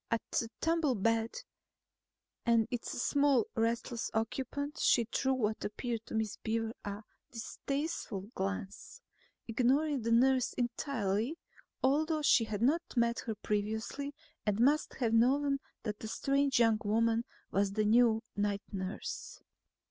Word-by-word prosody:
At 230 -1 0
the 230 - 0
tumbled 310 -10 +1
bed 225 0 +2 1.1
and 230 -2 +3
its 245 -1 -3
small 280 -3 +3
restless 230 +1 -1
occupant 270 +6 -2
she 235 - +4
threw 265 +4 0
what 220 -3 -1
appeared 230 +1 -3
to - - -5
Miss 220 -2 -1
Beaver 225 0 -2
a 205 +1 -5 0.3
distasteful 275 - -3
glance, 195 -1 -4 0.5
ignoring 265 +5 +2
the 230 +1 -1
nurse 255 +2 +4
entirely 240 0 -1 0.5
although 305 +3 +2
she 230 -4 +5
had 215 0 -3
not 305 +7 +4
met 235 -1 +2
her 220 - -1
previously 220 +8 -2 0.3
and 210 0 0
must 290 +6 +3
have 235 -4 0
known 275 +4 +3 0.2
that 210 -2 -3
the 220 - -6
strange 275 +3 +1
young 225 -2 +4
woman 225 +2 +2 0.3
was 195 0 +1
the 215 0 +1
new 225 0 +4
night 205 -1 0
nurse. 190 0 -5
230 Hz, 135 wpm, -33 LUFS, 220-270 Hz, 1.1 s, she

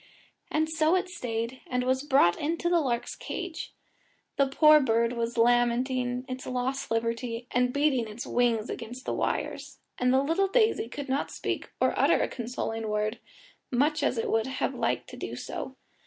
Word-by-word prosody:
And 315 +1 +1
so 315 +2 +2
it 370 0 0
stayed, 245 -7 -4
and 250 0 0
was 260 +1 +1
brought 270 -12 +4
into 330 +3 -1
the 345 -1 +4
lark's 245 -5 -1
cage. 360 -3 -5 0.6
The 275 - +3
poor 305 +3 +6
bird 235 -3 +2
was 235 0 -2
lamenting 245 +1 +2
its 255 0 -6
lost 255 +2 -2
liberty, 230 +1 -2
and 250 0 +2
beating 280 -4 +1
its 215 +3 -7
wings 235 -3 +1
against 245 +3 -7
the - - -1
wires; - - -2 0.2
and 250 0 +3
the 265 +1 +4
little 330 +7 +2
daisy 435 - +2
could 285 +3 -6
not 270 +2 -1
speak - - -4
or - - +3
utter - - +4
a - - +1
consoling 225 -2 -4
word, 210 +2 -1 0.5
much 290 +5 +2
as - - +1
it 225 - -1
would 225 +1 +1
have 265 - -2
liked - - -1
to - - -9
do - - -5
so. - - -6
250 Hz, 175 wpm, -28 LUFS, 235-290 Hz, 0.6 s, poor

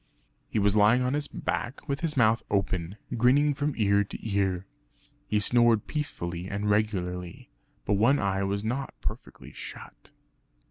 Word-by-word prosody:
He - - -2
was 100 0 +3
lying 110 +4 +5
on 125 +1 0
his 145 0 -1
back 120 +3 -4
with 140 0 -1
his 160 -4 -2
mouth 115 -1 +4
open, 95 -1 -1 0.2
grinning 140 +5 +4
from 145 +1 -2
ear 100 -2 +3
to 105 - -8
ear. 95 -3 0 0.6
He 105 - +1
snored 120 0 +3
peacefully 90 - -4
and 100 +1 -2
regularly; 90 -4 -1 0.3
but 105 - +1
one 115 +8 +4
eye 100 -3 0
was 100 +1 -1
not 125 +5 -3
perfectly - - -6
shut. - - -10
105 Hz, 150 wpm, -28 LUFS, 100-125 Hz, 0.6 s, lying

